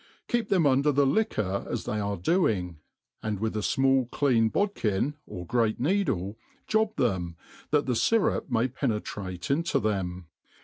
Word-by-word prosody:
Keep 240 -3 0
them 185 -5 +3
un 135 -1 +4
der 150 +1 +3
the 140 0 +3
liqubr 120 - 0
as - - -3
they 105 - -2
arc 100 -4 -3
doing, 95 - +1 0.4
and 105 -2 -2
with 110 +1 -2
a - - 0
fmall 135 +2 +2
clean 120 -6 +2
bod 205 - 0
kin, 105 - 0 0.2
of 90 -4 -7
great 115 -1 +1
needle, 125 - 0 0.3
job 220 0 +1
them, 90 - -1 0.3
that 150 -1 +2
the 125 - 0
fyrup 225 - +1
may 120 +1 +2
penetrate 105 -7 -3
into 155 0 +1
them. 95 -5 -2
120 Hz, 165 wpm, -27 LUFS, 100-145 Hz, 0.4 s, un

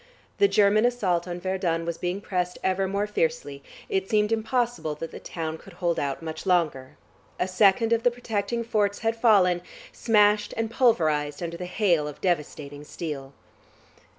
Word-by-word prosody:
The 400 - +6
German 210 - +4
assault 190 -8 +1
on 175 0 -5
Verdun 175 -3 -1
was 170 0 -4
being 180 +2 -2
pressed 180 -3 -2
ever 190 0 +1
more 200 +2 -1
fiercely; 485 - -2 0.3
it 390 -3 -1
seemed 210 -1 +2
impossible 225 -7 -1
that 165 +2 -7
the - - -8
town 160 -1 -5
could - - -14
hold 175 -2 -1
out 140 +2 -3
much 160 +3 -6
longer. 155 -8 0 0.4
A 180 - +1
second 205 +5 +3
of 230 - +2
the 245 - +4
protecting 235 -1 -3
forts 205 -3 0
had 225 0 +2
fallen, 195 -7 +4 0.3
smashed 210 -2 +2
and 225 0 -1
pulverised 155 - +1
under 170 0 -4
the 180 - -6
hail 175 -6 +1
of 150 - -8
devastating 150 -4 -2
steel.... 145 -3 -6
190 Hz, 165 wpm, -26 LUFS, 165-225 Hz, 0.4 s, The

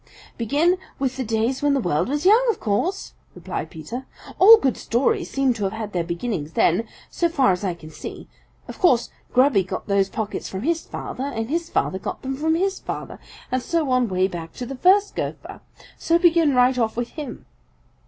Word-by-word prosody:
"Begin 300 - +1 0.2
with 260 -1 -1
the 265 - -2
days 230 +3 -1
when 290 -1 +2
the - - +2
world 175 - 0
was 295 +4 -2
young, 435 +6 +6
of 445 - 0
course," 250 - -1 0.2
replied 180 -2 -5
Peter. 230 - -7 0.3
"All 445 +4 +10
good 270 - 0
stories 350 - 0
seem 270 -2 +1
to 220 -3 -5
have 190 - -2
had 220 -2 -6
their 175 -2 0
beginnings 170 -2 -4
then, 215 +7 +2 0.2
so 340 - +1
far 275 -10 +3
as 180 +2 -2
I 185 -3 -1
can 155 -2 -12
see. - - -8 0.4
Of - - -9
course 255 -10 +3 0.2
Grubby 255 -5 +4
got 180 - -5
those 200 -1 +1
pockets 210 -1 -4
from 190 +2 -5
his 330 +2 0
father, 260 - -6
and 230 -3 -4
his 335 +1 -1
father 190 - -1
got - - -6
them 265 0 -3
from 320 +3 +1
his 385 +3 0
father, - - -6 0.3
and 255 0 0
so 320 -2 -1
on 250 -3 +2
way 185 0 +2
back 170 -3 -7
to 250 - -6
the 270 +3 -6
first 390 +8 +3
Gopher. - - -5 0.4
So 335 - +3
begin 335 -5 +4
right 250 +1 +4
off 225 -1 0
with 240 0 -2
him." 295 -5 -8
255 Hz, 200 wpm, -23 LUFS, 200-320 Hz, 0.4 s, All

